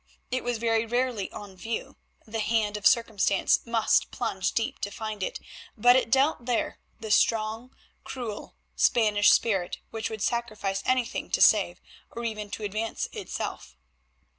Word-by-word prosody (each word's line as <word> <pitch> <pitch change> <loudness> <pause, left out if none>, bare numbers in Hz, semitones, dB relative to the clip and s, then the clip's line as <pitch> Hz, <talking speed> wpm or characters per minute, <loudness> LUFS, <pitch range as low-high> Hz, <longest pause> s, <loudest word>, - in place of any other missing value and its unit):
It 255 - -1
was 245 -1 -1
very 225 0 +1
rarely 240 -3 -1
on 200 -2 -9
view; 225 +5 -5 0.3
the 225 +1 -4
hand 215 -1 +1
of 210 - +3
circumstance 220 -5 +3
must 230 -2 +2
plunge 210 -6 -2
deep 225 - -2
to 200 - -3
find 215 0 -6
it, - - -3 0.4
but 245 +3 +6
it 260 - +2
dwelt 270 0 +2
there; 245 -2 -1 0.2
the 220 -2 -5
strong, 225 +3 +1 0.3
cruel 235 -5 -6 0.2
Spanish 210 -3 +4
spirit 195 -6 +1
which 225 -1 -3
would 220 -2 -5
sacrifice 215 -5 -1
anything 255 -2 0
to - - 0
save, - - +5 0.3
or 235 - -7
even 215 -2 -4
to 210 - -6
advance, 215 +2 -3
itself. - - -6
225 Hz, 150 wpm, -27 LUFS, 210-235 Hz, 0.4 s, but